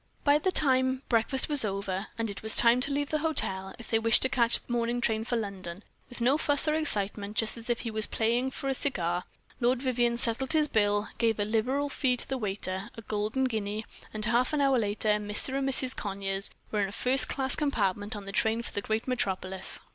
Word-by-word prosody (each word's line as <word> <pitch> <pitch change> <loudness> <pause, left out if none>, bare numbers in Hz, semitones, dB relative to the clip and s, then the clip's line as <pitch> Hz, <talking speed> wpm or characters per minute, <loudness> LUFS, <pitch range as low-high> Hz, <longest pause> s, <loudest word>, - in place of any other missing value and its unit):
By 290 0 +4
this 370 +4 -1
time 260 -2 +2
breakfast 245 +3 +3
was 290 -4 +5
over, 195 -1 -3
and 230 0 -2
it 200 -2 -7
was 220 0 +3
time 240 +1 +5
to 280 - +2
leave 285 0 -2
the 310 - 0
hotel, 190 -12 -1
if 235 - -11
they 225 - +3
wished 230 0 +3
to 260 - +2
catch 235 -3 +2
the 240 - -8
morning 240 0 -1
train 220 -2 0
for 240 - -2
London. 195 -4 -5 0.3
With 245 -1 -9
no 265 +5 +2
fuss 290 -1 +5
or 305 - +2
excitement, 210 -8 0
just 220 -1 +1
as 230 0 -10
if 240 - 0
he 230 - -5
was 215 0 +1
paying 235 +3 0
for 275 - -6
a 270 - +1
cigar; 180 -11 -2 0.3
Lord 245 0 +1
Vivianne 240 -2 0
settled 245 +3 +1
his 305 -1 +2
bill, 205 -4 0
gave 225 -2 +1
a 205 - 0
liberal 250 +7 -1
fee 260 -3 0
to - - -3
the 265 -1 -3
waiter 195 -1 -4
a 225 - -8
golden 215 +5 -2
guinea 215 -3 -3 0.3
and 215 0 -2
half 240 +4 +1
an 300 - +1
hour 270 -2 +3
later 210 0 -2
"Mr. 210 +4 0
and 270 0 -1
Mrs. 260 -1 +3
Conyers" 195 -1 -4 0.2
were 210 - 0
in 195 - -1
a - - -10
first 255 +6 +6
class 265 -2 +1
compartment, 205 -8 -1
on 205 -1 -8
the 195 - -7
train 220 +3 0
for - - -7
the 205 - -3
great 220 +3 -3
metropolis. 190 -6 0
230 Hz, 225 wpm, -28 LUFS, 205-260 Hz, 0.3 s, first